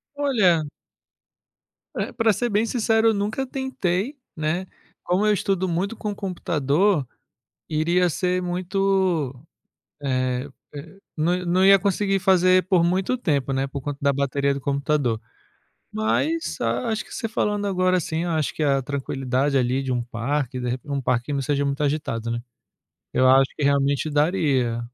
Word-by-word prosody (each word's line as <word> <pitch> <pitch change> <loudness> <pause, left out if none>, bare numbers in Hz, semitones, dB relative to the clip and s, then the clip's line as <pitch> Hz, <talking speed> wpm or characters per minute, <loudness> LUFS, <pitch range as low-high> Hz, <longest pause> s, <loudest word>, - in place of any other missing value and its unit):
Olha 215 - +3 1.3
Eh, - - -2
pra 225 -2 +3
ser 240 +5 -1
bem 215 +1 +2
sincero 225 -1 +2
eu - - +2
nunca 215 +6 -2
tentei, 260 - -2 0.2
né. 160 +4 -1 0.4
Como 185 +4 +1
eu 210 - +4
estudo 190 -2 0
muito 185 +6 -1
com 210 -1 -3
computador, 175 - 0 0.6
iria 170 +4 +2
ser 180 +2 0
muito, 180 -4 0 0.7
eh 130 0 -1 0.3
eh, 160 +6 -9 0.2
não 175 +3 0
não 185 +2 +3
ia 195 0 +8
conseguir 195 +1 +1
fazer 185 -1 +4
por 185 -3 +3
muito 185 +7 +1
tempo, 140 - 0
né, 135 +1 0
por 140 0 -6
conta 145 +1 -5
da 140 - +3
bateria 140 0 0
do 140 - -4
computador. 140 -4 0 0.7
Mas, 315 +10 -1
a 240 - -1
acho 220 -1 -2
que - - -12
você 225 - -3
falando 205 -1 -1
agora 185 -1 +2
assim, 160 -1 -2
eu 175 - -2
acho 155 -3 -1
que - - -6
a 140 -2 +2
tranquilidade 135 0 -1
ali 130 +1 +1
de 130 - -3
um 120 - -1
parque, 125 +2 -2
de 125 - -2
repe 130 +4 -5
um 140 -1 -1
parque 125 +2 -1
não 140 - -1
seja 140 +1 0
muito 140 +1 -2
agitado, 140 -6 -2
né. 120 0 -2 0.7
Eu 130 - +3
acho 135 +1 +5
que 150 - -3
realmente 140 +1 +2
daria. 145 -7 +1
160 Hz, 160 wpm, -23 LUFS, 140-195 Hz, 1.3 s, ia